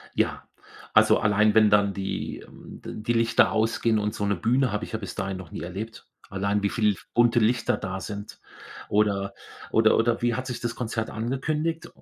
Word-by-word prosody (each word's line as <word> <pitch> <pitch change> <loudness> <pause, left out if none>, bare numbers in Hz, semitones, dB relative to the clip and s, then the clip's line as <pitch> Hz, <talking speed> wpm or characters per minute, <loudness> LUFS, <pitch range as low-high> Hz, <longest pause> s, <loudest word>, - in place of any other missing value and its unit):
Ja. - - 0 0.5
Also, - - +5
allein, 105 0 +3
wenn 110 -1 +6
dann 100 -1 +3
die 95 0 -4
ähm, - - -13
die 110 +2 -3
Lichter 115 -1 +3
ausgehen 110 0 +1
und 105 +1 -2
so 105 - -2
'ne 100 0 +1
Bühne 125 +7 +1
habe 105 +2 -2
ich - - -12
ja 110 - -2
bis 100 - -7
dahin 95 0 -3
noch 95 -4 -10
nie - - -6
erlebt. 100 +6 -7 0.2
Allein 100 +1 -1
wie 100 - +2
viel 105 -1 +2
f 85 - -15
bunte 120 0 +4
Lichter 115 +2 +1
da 95 0 -5
sind 100 +1 -7 0.5
oder 100 -2 +1 0.4
oder 110 0 +4
oder 115 0 +1
wie 120 0 +1
hat 130 0 -4
sich 125 -2 -4
das 120 -1 -3
Konzert 115 -2 -3
angekündigt? 150 +8 -2
110 Hz, 195 wpm, -25 LUFS, 100-115 Hz, 0.5 s, wenn